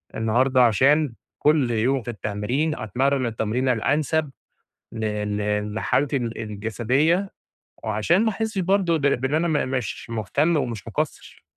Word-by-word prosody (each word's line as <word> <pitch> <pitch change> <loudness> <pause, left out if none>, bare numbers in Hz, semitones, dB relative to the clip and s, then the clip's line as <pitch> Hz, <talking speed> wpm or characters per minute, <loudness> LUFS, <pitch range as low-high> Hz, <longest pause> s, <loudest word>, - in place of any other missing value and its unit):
النهاردة، 125 +4 +3
عشان 140 +5 +3 0.3
كل 150 -5 +3
يوم 125 +4 +1
في 120 - -4
التمرين 120 +9 -2
أتمرّن 130 +5 0
التمرينة 120 +3 0
الأنسب 145 +5 0 0.6
ل 110 -1 -3
ل 105 0 -2
لحالتي 140 +5 0
ال 115 -2 -4
الجسديّة، 120 - 0 0.5
وعشان 110 - +2
ما 220 - +3
احسش 220 -1 -3
برضه 185 -2 +2
ب 150 - -6
بإن 135 -1 +1
أنا 170 +2 +1
م 145 -5 0
مش 125 -3 -4
مهتم، 130 - +1
ومش 120 -8 -3
مقصّر؟ - - -4
130 Hz, 135 wpm, -23 LUFS, 110-150 Hz, 0.6 s, النهاردة